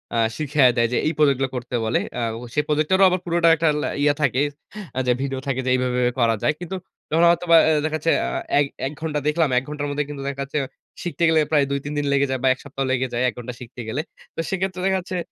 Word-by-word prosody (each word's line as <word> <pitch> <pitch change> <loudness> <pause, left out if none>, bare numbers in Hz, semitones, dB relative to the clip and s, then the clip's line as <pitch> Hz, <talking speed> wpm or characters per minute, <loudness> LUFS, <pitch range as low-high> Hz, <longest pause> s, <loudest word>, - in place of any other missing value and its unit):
আ - - +1 0.2
শিখায়ে 145 -4 +3
দেয় 115 0 +3
যে, - - +2
এই 155 - +1
প্রজেক্ট 140 -4 +4
গুলো 135 -1 0
করতে 125 0 -4
বলে। 110 - +1 0.2
আ - - -1 0.3
সেই 150 - +1
প্রজেক্টেরও 155 +6 +2
আবার 185 +1 0
পুরোটা 170 -1 +2
একটা 165 0 +1
লা - - -1 0.2
ইয়ে 145 0 +4
থাকে 135 -2 +2 0.7
যে, 125 - +4
ভিডিও 135 -1 -2
থাকে 135 -1 -1
যে, - - 0
"এইভাবে, 125 -1 0
এইভাবে 125 0 +1
করা 115 -2 +3
যায়।" 150 - +3
কিন্তু 180 +2 -5 0.4
যখন 165 +2 +3
হয়তোবা 170 -1 +4
অ্যা 155 -1 +3
দেখাচ্ছে 155 +1 0
অ্যা - - -2 0.2
এক 145 - +4 0.2
১ - - -5
ঘন্টা 155 -2 -1
দেখলাম, 150 -1 +2
১ 125 - +2
ঘন্টার 150 -1 -3
মধ্যে 145 +1 -1
কিন্তু 145 -2 -6
দেখাচ্ছে, 140 +1 -4 0.5
শিখতে 175 -1 -3
গেলে 160 - +4
প্রায় 145 -3 +4
২-৩ 140 +1 -3
দিন 145 - 0
লেগে 140 0 +3
যায় 130 - -1
বা - - +3
১ 130 - -15
সপ্তাহা 135 -1 -3
লেগে 130 0 +1
যায়। 120 +1 0
১ - - -7
ঘন্টা 125 +1 -6
শিখতে 125 0 -9
গেলে। 130 +7 -2 0.3
তো - - -7
সেক্ষেত্রে 190 -1 -2
দেখা 190 0 +2
যাচ্ছে 180 0 -5
145 Hz, 240 wpm, -22 LUFS, 130-160 Hz, 0.7 s, প্রজেক্ট